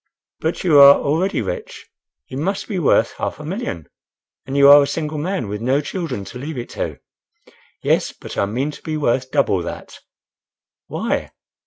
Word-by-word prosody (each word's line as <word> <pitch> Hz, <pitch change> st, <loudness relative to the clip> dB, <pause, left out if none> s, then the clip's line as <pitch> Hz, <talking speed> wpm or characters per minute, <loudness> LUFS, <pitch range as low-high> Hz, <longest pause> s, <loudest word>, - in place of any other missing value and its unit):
"But 160 Hz, +2 st, -2 dB
you 155 Hz, -6 st, +5 dB
are 140 Hz, 0 st, +10 dB
already 170 Hz, +8 st, 0 dB
rich—you -, -, -9 dB
must 190 Hz, +8 st, -2 dB
be 195 Hz, -5 st, -2 dB
worth 155 Hz, -, +3 dB
half -, -, -3 dB
a 150 Hz, -, -8 dB
million? 155 Hz, -, -5 dB, 0.6 s
and 135 Hz, +1 st, -2 dB
you 140 Hz, 0 st, +7 dB
are 145 Hz, +1 st, +9 dB
a 140 Hz, -, +1 dB
single 150 Hz, +1 st, -3 dB
man, 180 Hz, -, -2 dB
with 105 Hz, +1 st, -5 dB
no 130 Hz, +4 st, +2 dB
children 155 Hz, -, -4 dB
to 125 Hz, -, -9 dB
leave 145 Hz, +2 st, -6 dB
it 120 Hz, -, -5 dB
to." -, -, -4 dB, 0.9 s
"Yes, -, -, +1 dB
but -, -, -10 dB
I 100 Hz, -, +1 dB
mean 130 Hz, +8 st, -2 dB
to -, -, -13 dB
be 155 Hz, -1 st, -3 dB
worth 130 Hz, -2 st, 0 dB
double 130 Hz, -10 st, +1 dB
that." -, -, -8 dB, 0.9 s
"Why?" -, -, -2 dB
145 Hz, 175 wpm, -20 LUFS, 130-165 Hz, 0.9 s, are